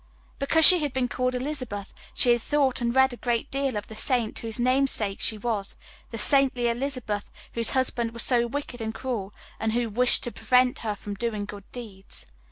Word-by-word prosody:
Because 315 +3 +4
she 365 -2 +10
had 295 -4 -3
been 260 -1 -1
called 255 +1 -2
Elizabeth 250 -7 -4 0.2
she 245 - +3
had 240 -1 +1
thought 275 -1 0
and 235 +1 -2
read 265 -1 +3
a - - -9
great 240 +2 -3
deal 275 -4 -2
of 205 - -5
the 220 - -12
saint 235 -1 +2
whose 225 0 -2
namesake 250 -5 +3
she 220 - 0
was 210 -3 -3 0.3
the 230 - -7
saintly 255 0 +4
Elizabeth 235 -4 -3 0.2
whose 230 -1 -1
husband 245 -2 0
was 235 0 +1
so 240 -2 +2
wicked 250 -1 -6
and 220 0 -5
cruel, 225 -6 -5 0.3
and 220 0 -2
who 235 -1 -2
wished 245 +3 +4
to 240 - 0
prevent 250 0 +1
her 215 -2 -4
from 205 0 -8
doing 210 -1 -4
good 200 -1 -12
deeds. 210 -6 -6
240 Hz, 195 wpm, -25 LUFS, 220-260 Hz, 0.3 s, she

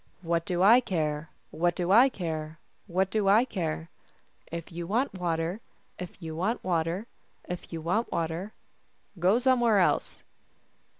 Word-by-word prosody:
" - - -36
What 170 0 +1
do 180 0 +1
I 225 +5 +8
care? 155 -7 -2 0.2
What 175 +1 +1
do 175 0 -1
I 245 +6 +7
care? 160 -7 -4 0.3
What 190 +1 0
do 215 -3 +1
I 215 +5 +6
care? 165 -6 -4 0.3
" - - -31
If 170 - -9
you 170 0 -5
want 240 +8 0
water, 175 +2 -2 0.4
If 180 +1 -8
you 160 -3 -6
want 195 +8 -1
water, 175 +3 -1 0.4
If 180 0 -6
you 165 -1 -4
want 210 +8 0
water, 170 +5 -2 0.7
Go 185 +6 +4
somewhere 240 -4 +3
else." 185 - +1
180 Hz, 160 wpm, -28 LUFS, 165-210 Hz, 0.7 s, I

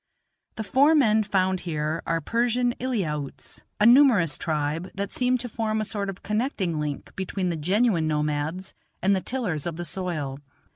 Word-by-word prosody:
The 220 - -4
four 275 +9 +4
men 220 -7 +4
found 190 -3 +1
here 155 -1 -2
are 165 - +1
Persian 240 +6 +1
Eliautes, 170 - -3 0.2
a 210 - +4
numerous 235 - +6
tribe, 155 +3 -2
that 200 0 -3
seem 255 0 +1
to 245 0 -5
form 220 -1 -2
a 215 - -1
sort 200 -2 -3
of 195 - -8
connecting 210 - -1
link 150 -2 -5
between 190 -1 -2
the 170 - -1
genuine 180 +1 +2
nomads 150 +4 -2 0.3
and 195 +1 +4
the 190 - -1
tillers 190 - -2
of 170 - -3
the 175 +1 -5
soil. 155 -6 -3
190 Hz, 165 wpm, -25 LUFS, 155-225 Hz, 0.3 s, numerous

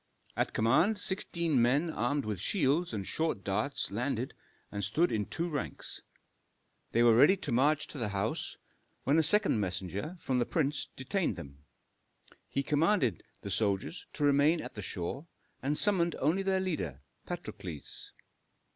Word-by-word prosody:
At - - 0
command 160 - +3
sixteen 170 -8 0
men 140 +8 +2
armed 140 +3 -1
with 105 -4 -3
shields 160 - +1
and 100 -4 -3
short 160 -9 -1
darts 105 +8 -1
landed 125 +3 -2 0.4
and 100 -1 -3
stood 150 - +2
in 105 -2 -1
two 170 - -2
ranks. 145 -5 -4 0.9
They 120 - +3
were 115 -1 +6
ready 150 - +6
to 160 -7 -4
march 150 +5 +3
to 145 - -7
the 110 -3 0
house, 100 -1 -2 0.5
when 145 +4 +3
a - - +6
second 195 - +4
messenger 95 - -3
from 130 -5 0
the 120 - +2
prince 150 -3 0
detained 150 - -1
them. 70 -5 -10 0.9
He 140 - -1
commanded 150 - +2 0.2
the 100 - -5
soldiers 100 - -1
to 150 - -2
remain 145 +3 +4
at - - -6
the 105 - -6
shore, 95 - -4 0.3
and 145 +3 0
summoned 175 -5 +4
only 175 +6 +1
their 190 -1 +1
leader, 90 - -3 0.3
Patrokles. 80 -6 -6
140 Hz, 155 wpm, -31 LUFS, 105-165 Hz, 0.9 s, were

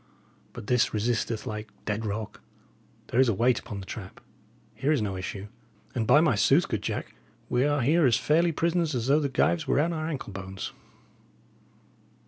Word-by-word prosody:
But - - -8
this 125 -1 +2
resisteth 110 0 -1
like 105 0 -5 0.2
dead 110 +1 -2
rock. 105 +1 -5 0.7
There 120 - +1
is 130 -2 +5
a 110 - +1
weight 120 +4 +3
upon 105 -5 -7
the - - -9
trap. 95 -1 -8 0.5
Here 145 - 0
is 150 - +3
no 100 -3 -2
issue; 95 +2 -5 0.5
and, 110 -3 -1
by 145 +6 +6
my 155 -6 +3
sooth, 135 - +4
good 110 -3 -2
Jack, - - -4 0.4
we 125 +2 +2
are 145 -1 +1
here 150 +4 +4
as 120 -2 +4
fairly 165 +6 +2
prisoners 165 -1 0
as 120 -2 -1
though 140 +3 +4
the 145 -2 -1
gyves 160 +3 +1
were - - +2
on 165 +3 +1
our 155 -1 -3
ankle 140 -10 -5
bones. 95 0 -6
125 Hz, 185 wpm, -27 LUFS, 105-150 Hz, 0.7 s, by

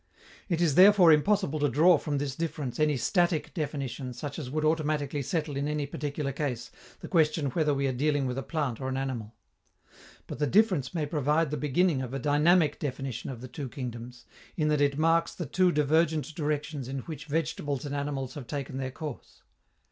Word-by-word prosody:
It 170 -2 0
is 165 -5 +3
therefore 185 0 +7
impossible 155 0 +2
to 145 0 +2
draw 160 +5 +5
from 145 -2 -2
this 140 -2 -3
difference 150 -6 -4
any 150 -2 +2
static 175 +3 +1
definition 140 -5 -4
such 145 +5 -6
as 135 -5 -5
would 155 +3 -1
automatically 150 -2 0
settle 150 +1 -2
in 140 +1 -1
any 150 -1 -1
particular 145 0 -3
case 130 -4 -3 0.3
the - - -7
question 155 -4 +2
whether 150 +1 +1
we 140 -1 0
are 135 - +1
dealing 145 +2 +1
with 125 +1 -2
a - - -2
plant 140 -7 -3
or 130 - -2
an 130 - -2
animal. 120 -5 -4 0.9
But - - -7
the 150 - +1
difference 180 - +2
may 155 -3 0
provide 150 +1 +1
the - - 0
beginning 150 0 +1
of 130 0 -5
a - - 0
dynamic 150 +3 +3
definition 130 -4 -4
of 125 -3 -7
the 130 - -7
two 135 +1 -6
kingdoms, 120 -2 -7 0.3
in 155 -2 +1
that 150 -1 +2
it 140 -1 +2
marks 165 +1 +2
the 175 - -4
two 180 +5 +2
divergent 155 +1 +1
directions 150 -3 -3
in 135 0 -4
which 155 +3 -8
vegetables 150 -2 -2
and 145 - -4
animals 140 -2 -3
have 140 -5 -8
taken 135 -2 -4
their 130 -1 -3
course. 145 0 -8
145 Hz, 195 wpm, -28 LUFS, 135-155 Hz, 0.9 s, therefore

